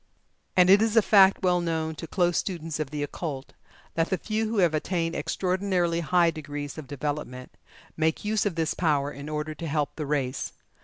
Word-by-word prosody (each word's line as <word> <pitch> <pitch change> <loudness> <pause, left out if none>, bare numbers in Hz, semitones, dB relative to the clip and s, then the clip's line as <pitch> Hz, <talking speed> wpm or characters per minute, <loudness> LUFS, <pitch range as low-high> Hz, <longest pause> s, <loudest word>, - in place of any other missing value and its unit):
And 180 0 +7
it 200 +2 +7
is 225 0 +1
a - - +9
fact 195 -2 +5
well 180 -1 +3
known 160 -2 -1
to 165 - -6
close 175 -1 +1
students 165 -4 -2
of 155 -3 -2
the 145 0 -3
occult, 145 -2 -5 0.4
that 165 0 0
the 190 - +1
few 215 +2 -2
who 225 - -2
have 175 -5 +4
attained 165 +1 -1
extraordinarily 185 -2 0
high 170 +1 +3
degrees 145 -2 -6
of 145 - -9
development, 145 -2 -5 0.4
make 160 +4 0
use 215 0 +1
of 185 - -3
this 160 -1 0
power 145 -4 +1
in 140 +1 -8
order 155 0 -3
to 165 +2 -6
help 150 -1 -1
the 150 -3 -3
race. 135 -3 -2
165 Hz, 195 wpm, -26 LUFS, 150-180 Hz, 0.4 s, a